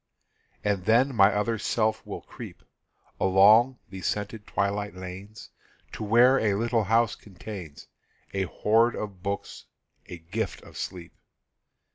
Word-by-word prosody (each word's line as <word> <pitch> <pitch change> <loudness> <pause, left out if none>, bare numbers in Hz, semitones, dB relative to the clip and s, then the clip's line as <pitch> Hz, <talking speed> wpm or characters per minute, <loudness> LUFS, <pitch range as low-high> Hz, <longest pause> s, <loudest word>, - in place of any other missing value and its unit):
And 100 -3 -1
then 125 +5 +3
my 100 -1 +6
other 110 +2 -1
self 110 0 0
will - - -6
creep - - -11 0.6
Along 105 +7 +5
the 95 -1 -7
scented 105 +2 -3
twilight 100 0 -2
lanes 95 +4 -9 0.4
To - - -6
where 120 +5 +5
a 105 -3 +1
little 115 0 0
house 115 +3 +3
contains 95 -5 -10 0.5
A 95 -1 0
hoard 115 +5 +2
of 100 -4 -6
books, 100 +2 -5 0.4
a 90 - -8
gift 90 +7 -4
of - - -15
sleep. 90 -3 -6
105 Hz, 130 wpm, -27 LUFS, 95-115 Hz, 0.6 s, my